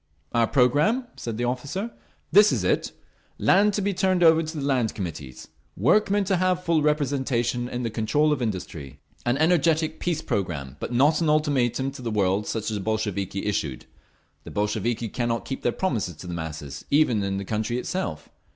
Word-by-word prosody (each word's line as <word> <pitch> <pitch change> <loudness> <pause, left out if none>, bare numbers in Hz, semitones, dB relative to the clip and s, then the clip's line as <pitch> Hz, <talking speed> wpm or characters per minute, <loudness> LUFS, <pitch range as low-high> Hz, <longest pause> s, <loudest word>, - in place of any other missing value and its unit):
"Our 115 -1 +2
programme?" 145 - +3
said 115 -2 -5
the 120 - -2
officer. 145 - -3 0.4
"This 205 +1 +7
is - - 0
it. - - +1 0.5
Land 200 +2 +4
to 205 - -1
be 200 0 0
turned 185 -1 +2
over 165 -1 +6
to 160 0 -5
the 145 - -3
Land 125 -5 +1
Committees. 75 - -7 0.3
Workmen 200 - +3
to 190 -1 +1
have 180 0 +1
full 165 -3 +2
representation 130 -5 0
in 125 0 -4
the 115 - -2
control 145 +8 +2
of 135 - -3
industry. 90 - -5 0.3
An 120 +2 +2
energetic 160 0 +2
peace 165 -3 -1
programme, 75 -9 -3
but - - -5
not 145 +7 +3
an 160 - +2
ultimatum 135 -4 +1
to 135 - -10
the 120 - -3
world 100 -1 +1
such 110 -1 -2
as 105 - -2
the - - -4
Bolsheviki 100 -3 -2
issued. 75 -10 -2 0.6
The - - -9
Bolsheviki 110 +3 -1
cannot 115 +1 -2
keep 135 - -5
their 120 - +1
promises 115 - -2
to 85 - -11
the 90 - -5
masses, 80 -3 -6
even 140 -7 +3
in 100 0 -1
the 100 - -4
country 110 +3 -2
itself. 110 - -3
125 Hz, 185 wpm, -25 LUFS, 105-160 Hz, 0.6 s, This